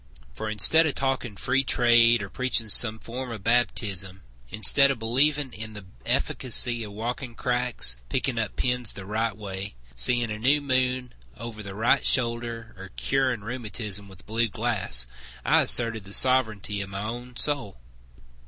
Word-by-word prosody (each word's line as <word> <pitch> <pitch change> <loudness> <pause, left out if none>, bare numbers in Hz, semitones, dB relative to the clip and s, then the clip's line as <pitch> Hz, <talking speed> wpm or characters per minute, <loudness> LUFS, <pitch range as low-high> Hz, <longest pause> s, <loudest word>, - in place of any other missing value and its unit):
For 110 - -6
instead 160 +10 +6
of 145 - -2
talking 130 -6 -3
free 135 +6 0
trade, 120 -3 +3
Or 100 - -8
preaching 125 -4 -1
some 110 +1 +5
form 125 +3 -7
of 110 -4 -8
baptism; 100 -5 -1 0.3
Instead 140 - +4
of 135 - -2
believing 135 +4 0
in 110 +1 -8
the 105 -2 -11 0.2
efficacy 120 -1 +2
Of 105 -2 -10
walking 120 +3 -6
cracks, 125 - 0
picking 125 - -2
up 110 -3 -4
pins 125 -2 +1
the 95 - -10
right 110 +2 -3
way, 95 - -7 0.2
Seeing 120 - +2
the 105 0 -6
new 135 +6 +2
moon 130 -2 -2 0.2
over 115 -1 -8
the 100 -2 -9
right 120 +6 +1
shoulder, 115 -2 -1
Or 95 0 -10
curing 130 -4 -1
rheumatism 105 -3 -5
with 95 -2 -16
blue 115 +2 -1
glass, 100 - -1 0.4
I - - +3
asserted 115 -3 +4
the 100 - -1
sovereignty 110 -6 +3
of 100 - -7
my 100 +1 -6
own 120 +3 -7
soul. 140 -10 -1
115 Hz, 160 wpm, -24 LUFS, 105-125 Hz, 0.4 s, instead